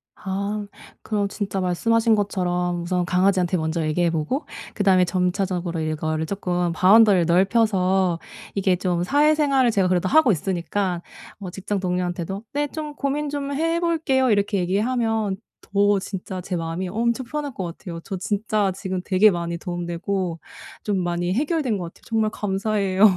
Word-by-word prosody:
아 200 Hz, +2 st, -3 dB, 0.4 s
그럼 205 Hz, -2 st, -1 dB
진짜 195 Hz, -1 st, -3 dB
말씀하신 225 Hz, +5 st, +2 dB
것처럼 180 Hz, -4 st, -1 dB
우선 180 Hz, 0 st, 0 dB
강아지한테 185 Hz, 0 st, +2 dB
먼저 160 Hz, +1 st, -1 dB
얘기해 170 Hz, +2 st, +1 dB
보고 165 Hz, -, -2 dB, 0.3 s
그다음에 190 Hz, -3 st, +4 dB
점차적으로 180 Hz, -2 st, -1 dB
이거를 155 Hz, 0 st, -1 dB
쪼끔 180 Hz, -2 st, -1 dB
바운더리를 195 Hz, -1 st, +6 dB
넓혀서 190 Hz, -1 st, +2 dB, 0.4 s
이게 190 Hz, -2 st, +2 dB
좀 175 Hz, -1 st, -1 dB
사회생활을 285 Hz, 0 st, +3 dB
제가 195 Hz, -3 st, +2 dB
그래도 180 Hz, -1 st, +1 dB
하고 305 Hz, -6 st, +5 dB
있으니까 180 Hz, +1 st, -1 dB, 0.4 s
뭐 190 Hz, -3 st, -6 dB
직장 195 Hz, +2 st, -3 dB
동료한테도 180 Hz, +2 st, -2 dB
'네 290 Hz, +1 st, 0 dB
좀 300 Hz, -1 st, -6 dB
고민 285 Hz, +1 st, -1 dB
좀 285 Hz, -1 st, -3 dB
해볼게요.' 320 Hz, -4 st, +1 dB
이렇게 200 Hz, -1 st, +1 dB
얘기하면 220 Hz, +2 st, 0 dB, 0.3 s
더 205 Hz, 0 st, +2 dB
진짜 185 Hz, -1 st, -6 dB
제 180 Hz, 0 st, -4 dB
마음이 165 Hz, +2 st, -3 dB
엄청 235 Hz, +5 st, 0 dB
편할 290 Hz, +2 st, -4 dB
것 190 Hz, -, -4 dB
같아요. 170 Hz, 0 st, -7 dB
저 190 Hz, -, -5 dB
진짜 210 Hz, 0 st, 0 dB
지금 190 Hz, -2 st, -3 dB
되게 200 Hz, +3 st, +5 dB
많이 170 Hz, -1 st, -3 dB
도움 175 Hz, 0 st, -4 dB
되고 175 Hz, 0 st, -2 dB, 0.4 s
좀 200 Hz, -3 st, 0 dB
많이 175 Hz, 0 st, -1 dB
해결된 285 Hz, -, 0 dB
것 180 Hz, -, -4 dB
같아요. 165 Hz, -, -12 dB
정말 220 Hz, -2 st, +1 dB
감사해요. 200 Hz, -1 st, 0 dB
195 Hz, 350 characters per minute, -23 LUFS, 180-220 Hz, 0.4 s, 바운더리를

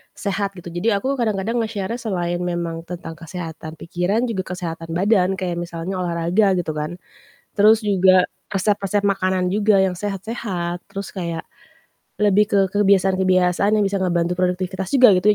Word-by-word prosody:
sehat 200 Hz, -1 st, -2 dB
gitu. 175 Hz, -1 st, -9 dB
Jadi 190 Hz, +6 st, 0 dB
aku 265 Hz, +6 st, -1 dB
kadang-kadang 220 Hz, +1 st, 0 dB
nge-share-nya 220 Hz, +1 st, -3 dB
selain 175 Hz, -6 st, -2 dB
memang 170 Hz, -2 st, -3 dB
tentang 175 Hz, -2 st, -6 dB
kesehatan 165 Hz, -2 st, -7 dB
pikiran, 180 Hz, +7 st, 0 dB
juga 190 Hz, -4 st, -3 dB
kesehatan 165 Hz, -2 st, -5 dB
badan, 195 Hz, 0 st, +3 dB
kayak 180 Hz, -2 st, -3 dB
misalnya 175 Hz, +2 st, -4 dB
olahraga, 175 Hz, +3 st, +2 dB
gitu 175 Hz, -3 st, -1 dB
kan. 150 Hz, +2 st, -4 dB, 0.6 s
Terus 215 Hz, +2 st, +6 dB
juga 185 Hz, -2 st, +5 dB, 0.3 s
resep-resep 200 Hz, +1 st, +1 dB
makanan 185 Hz, -2 st, +1 dB
juga 205 Hz, 0 st, +3 dB
yang 185 Hz, -1 st, 0 dB
sehat-sehat, 195 Hz, -4 st, -4 dB
terus 200 Hz, 0 st, -6 dB
kayak, 170 Hz, -4 st, -4 dB, 0.7 s
lebih 210 Hz, 0 st, +3 dB
ke 205 Hz, -1 st, +1 dB
kebiasaan-kebiasaan 190 Hz, -1 st, +3 dB
yang 215 Hz, -, +3 dB
bisa 200 Hz, 0 st, 0 dB
ngebantu 175 Hz, -1 st, 0 dB
produktivitas 185 Hz, +1 st, -1 dB
juga 255 Hz, -4 st, +8 dB
gitu 210 Hz, +3 st, +4 dB
190 Hz, 145 wpm, -21 LUFS, 175-205 Hz, 0.7 s, juga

